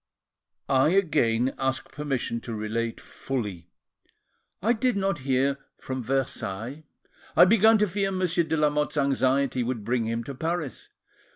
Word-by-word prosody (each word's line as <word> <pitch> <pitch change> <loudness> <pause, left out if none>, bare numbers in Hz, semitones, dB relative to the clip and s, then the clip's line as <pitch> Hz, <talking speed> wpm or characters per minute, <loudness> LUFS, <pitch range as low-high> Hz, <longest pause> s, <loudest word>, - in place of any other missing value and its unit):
"I 135 +2 +4
again 135 - +2
ask 130 0 -2
permission 135 -5 -3
to 115 - -6
relate 110 +2 -3
fully. 105 -10 -5 0.9
I 225 +6 +2
did 245 -1 0
not 195 -4 0
hear 135 +1 +1 0.2
from 130 -1 -5
Versailles: 130 +1 -3 0.5
I - - +9
began 220 +3 +5
to 210 0 +2
fear 195 +1 -1
Monsieur 180 -2 +1
de 160 - -1
Lamotte's 150 0 +1
anxiety 135 -1 +2
would 120 -2 -2
bring 120 -1 0
him 115 +1 -2
to 140 - -6
Paris. 160 0 -3
135 Hz, 135 wpm, -26 LUFS, 120-170 Hz, 0.9 s, I